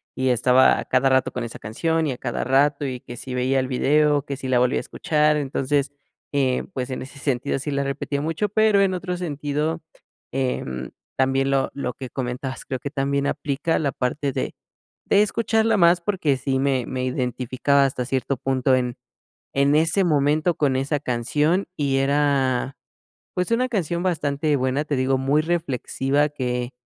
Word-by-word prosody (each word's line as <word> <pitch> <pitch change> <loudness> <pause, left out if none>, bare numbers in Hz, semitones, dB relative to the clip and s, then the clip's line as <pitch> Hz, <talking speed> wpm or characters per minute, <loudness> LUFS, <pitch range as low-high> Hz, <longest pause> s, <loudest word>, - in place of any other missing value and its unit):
Y 130 0 0
estaba 125 +1 +4
a - - -5
cada 130 +1 +2
rato 130 0 +2
con 125 - -3
esa 115 - -7
canción 160 +9 -1
y 135 - -1
a 125 - -9
cada 120 -3 -3
rato, 140 +2 +2
y 130 -2 -4
que 120 - -9
si 130 - -7
veía 130 +2 +1
el 130 - -1
video, 145 +2 +2
que 140 -2 -4
si 130 - -6
la 125 -1 +3
volvía 125 +1 +2
a - - -3
escuchar, 150 -1 +1
entonces, 140 0 -1 0.4
eh, 130 -3 +1
pues, 130 0 -3
en 130 - -4
ese 135 +2 -10
sentido 135 0 -1
sí 145 +2 -4
le 140 0 0
repetía 140 +1 -3
mucho. 165 +7 -1
Pero 215 0 +3
en 190 -1 +2
otro 180 0 -3
sentido, 150 -1 -2 0.5
eh, 130 -1 -1 0.5
también 135 +1 +2
lo 135 -1 +1
lo 125 -3 -3
que 130 0 -8
comentabas, 130 +1 -4
creo 130 - -3
que 140 - -5
también 140 0 0
aplica 145 +3 -1
la 145 -3 0
parte 135 +3 -2
de - - -3 0.5
de 200 - +4
escucharla 225 +1 +2
más, 170 0 +5
porque 170 -8 0
sí 130 0 -1
me 135 -3 +1
me 130 -1 -3
identificaba 130 +2 +1
hasta 125 -2 -2
cierto 135 +1 -1
punto 130 0 +1
en 125 -1 -1 0.6
en 140 +1 +3
ese 165 +5 +3
momento 155 +1 +2
con 140 -4 +1
esa 140 +2 -1
canción 150 +8 0
y 140 -2 +1
era, 135 -2 +1 0.6
pues, 180 +5 -1
una 250 +2 +2
canción 175 -6 -1
bastante 150 -4 0
buena. 130 +3 0
Te 145 - -1
digo, 130 +1 +1
muy 140 +3 +2
reflexiva 145 -3 0
que 125 -3 -3
140 Hz, 180 wpm, -23 LUFS, 130-150 Hz, 0.6 s, más